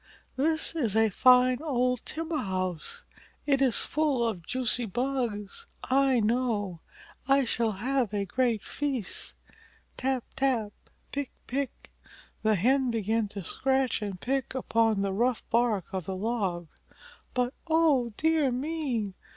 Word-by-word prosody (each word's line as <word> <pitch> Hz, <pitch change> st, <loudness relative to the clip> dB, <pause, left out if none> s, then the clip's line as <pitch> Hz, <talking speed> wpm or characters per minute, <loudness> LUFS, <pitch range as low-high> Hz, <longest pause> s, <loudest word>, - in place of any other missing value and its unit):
This 315 Hz, +5 st, +1 dB
is 235 Hz, -10 st, 0 dB
a 220 Hz, -1 st, +4 dB
fine 250 Hz, +4 st, +5 dB
old 250 Hz, -5 st, 0 dB
timber 325 Hz, 0 st, -2 dB
house. 185 Hz, -4 st, -3 dB, 0.4 s
It 275 Hz, -2 st, +2 dB
is 260 Hz, -4 st, +4 dB
full 285 Hz, -6 st, +1 dB
of 190 Hz, -7 st, -3 dB
juicy 250 Hz, -2 st, 0 dB
bugs, 245 Hz, -, -2 dB, 0.2 s
I 265 Hz, -1 st, +3 dB
know. 215 Hz, -5 st, 0 dB, 0.5 s
I 275 Hz, 0 st, +4 dB
shall 230 Hz, -2 st, 0 dB
have 245 Hz, +2 st, 0 dB
a 205 Hz, -1 st, -1 dB
great 235 Hz, +1 st, 0 dB
feast!" 270 Hz, -9 st, -3 dB, 0.6 s
Tap 260 Hz, -2 st, 0 dB
tap! 245 Hz, -6 st, +1 dB, 0.4 s
Pick 280 Hz, -2 st, -3 dB, 0.2 s
pick! 270 Hz, 0 st, -4 dB, 0.5 s
The 215 Hz, -1 st, +3 dB
Hen 260 Hz, +7 st, +3 dB
began 225 Hz, -1 st, 0 dB
to 200 Hz, -1 st, -7 dB
scratch 265 Hz, +5 st, 0 dB
and 200 Hz, -3 st, -4 dB
peck 265 Hz, +2 st, -2 dB
upon 225 Hz, -4 st, +2 dB
the 195 Hz, -1 st, 0 dB
rough 240 Hz, +4 st, 0 dB
bark 230 Hz, -5 st, +2 dB
of 185 Hz, -3 st, -3 dB
the 190 Hz, -, -3 dB
log, 190 Hz, -5 st, -2 dB, 0.7 s
but 250 Hz, 0 st, +1 dB
Oh 310 Hz, -7 st, +3 dB
dear 320 Hz, -3 st, +3 dB
me! 255 Hz, -6 st, -2 dB
245 Hz, 135 wpm, -28 LUFS, 210-270 Hz, 0.7 s, fine